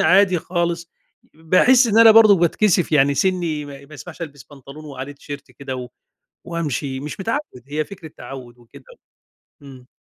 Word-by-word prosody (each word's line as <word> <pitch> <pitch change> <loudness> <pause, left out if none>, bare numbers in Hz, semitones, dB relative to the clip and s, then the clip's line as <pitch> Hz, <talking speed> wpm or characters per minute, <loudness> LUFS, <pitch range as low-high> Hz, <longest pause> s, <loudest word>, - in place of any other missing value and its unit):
عادي 195 -1 +4
خالص، 170 0 -3 0.4
باحس 185 - +4
إن 220 -1 +2
أنا 230 -1 +9
برضه 215 -2 +7
باتكسف 175 0 +1
يعني، 140 -1 +4
سنّي 170 -2 -1
ما 140 -1 -11
ما 150 - -14
يسمحش 165 +3 -10
ألبس 145 -5 -9
بنطلون 145 +2 -13
وعليه 140 -1 -8
تيشيرت 145 0 -10
كده 135 -2 -7
و 125 -1 -7 0.6
وأمشي، 145 -5 -3
مش 150 +6 -7
متعود، 230 - -4
هي 150 +1 -2
فكرة 180 -5 -11
تعوّد 125 -1 -10
وكده، 120 -1 -17 0.8
امم. 130 -3 -13
155 Hz, 155 wpm, -20 LUFS, 140-185 Hz, 0.8 s, أنا